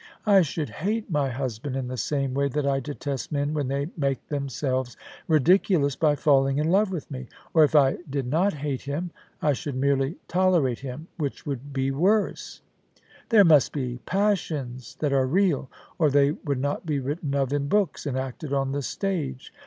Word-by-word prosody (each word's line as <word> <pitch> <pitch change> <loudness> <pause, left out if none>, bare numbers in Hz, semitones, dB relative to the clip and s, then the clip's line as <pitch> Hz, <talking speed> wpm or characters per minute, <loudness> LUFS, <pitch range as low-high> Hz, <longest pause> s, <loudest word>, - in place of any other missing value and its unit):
I 200 -3 +6
should 155 -2 -2
hate 210 +3 -2
my 145 -3 +1
husband 130 +1 -4
in 130 -2 -2
the 130 - -4
same 135 0 -1
way 140 +1 +1
that 145 +1 -2
I 135 -1 +2
detest 140 -1 -5
men 145 0 0
when 145 -3 -1
they 140 +4 -2
make 140 -4 -2
them 140 -2 -2
selves 130 -1 -2 0.3
ridiculous 160 -2 +3
by 150 -2 +2
falling 135 -2 +3
in 155 +3 +1
love 200 +2 +3
with 165 -5 -5
me; 130 -2 -6 0.3
or 160 - +6
if 150 - +2
I 135 -2 +4
did 135 -1 -2
not 165 +10 +2
hate 145 -4 -3
him, 155 +6 -4 0.3
I 150 - +4
should 145 0 -5
merely 135 +3 +1
tolerate 175 -9 +2
him, 135 +4 -7
which 145 -5 -4
would 140 0 -5
be 135 0 0
worse. 195 +10 0 0.7
There 215 -4 +7
must 150 -5 +5
be 125 -4 -3
passions 155 - -1
that 145 -2 +1
are 135 -1 +3
real, 165 -4 +1 0.3
or 155 -3 +4
they 140 0 +4
would 140 -3 -3
not 145 +2 -2
be 155 -4 -1
written 140 +2 -3
of 135 -1 0
in 140 -1 0
books 200 -2 0
and 130 -2 -2
acted 130 +3 -5
on 135 -1 0
the 140 +1 -2
stage. 140 -4 -3
140 Hz, 190 wpm, -25 LUFS, 135-160 Hz, 0.7 s, There